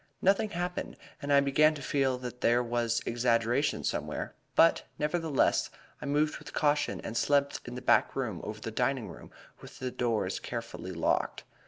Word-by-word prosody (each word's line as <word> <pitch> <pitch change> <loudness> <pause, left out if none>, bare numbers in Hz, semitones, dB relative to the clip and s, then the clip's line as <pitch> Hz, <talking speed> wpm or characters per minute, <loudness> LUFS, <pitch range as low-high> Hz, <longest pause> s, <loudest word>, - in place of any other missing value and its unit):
Nothing 200 +3 +3
happened, 180 -1 -4 0.2
and 145 -1 -3
I 140 0 +6
began 150 +3 +4
to 145 - -7
feel 135 -1 +1
that 125 -1 -7
there 120 +1 +3
was 120 -1 0
exaggeration 120 +3 +1
somewhere; - - -3 0.2
but, 165 - +5 0.2
nevertheless, 155 -2 +1 0.3
I - - -5
moved 150 +2 +1
with - - -11
caution 145 -1 +1
and 115 - -6
slept 140 +3 +2
in 125 - -7
the 125 - -7
back - - +3
room 115 -9 -2
over 105 0 -6
the 115 - -5
dining 125 +1 0
room - - -11 0.3
with - - -12
the 130 -1 -4
doors 110 -7 -1
carefully 115 -5 -6
locked. 85 -2 0
125 Hz, 170 wpm, -30 LUFS, 115-145 Hz, 0.3 s, I